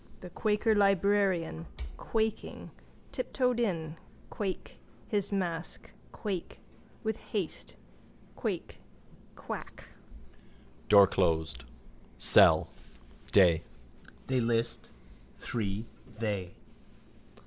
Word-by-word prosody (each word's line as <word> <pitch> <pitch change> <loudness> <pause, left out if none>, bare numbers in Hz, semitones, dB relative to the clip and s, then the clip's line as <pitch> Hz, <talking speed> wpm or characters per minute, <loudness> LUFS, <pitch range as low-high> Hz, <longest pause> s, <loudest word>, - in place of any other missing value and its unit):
The 180 - -9
quaker 215 +3 +2
librarian, 195 - +2 0.3
quaking, 220 - -2 0.4
tiptoed 250 - 0
in, 165 -8 -1 0.3
quake, 195 -3 -4 0.3
his 205 -3 -1
mask, 175 -4 -3 0.2
quake, 195 -6 -4 0.4
with 220 -1 -1
haste, 195 -7 -5 0.6
quake, - - -4 0.6
quack. - - -8 1.0
Door 100 -1 +9
closed. 80 -9 0 0.5
Cell. - - +6 0.6
Day. 85 -5 +6 0.6
They 130 -1 +1
list. 115 0 0 0.5
Three. 105 -2 -2 0.3
They. 100 -6 -2
170 Hz, 75 wpm, -31 LUFS, -, 1.0 s, Door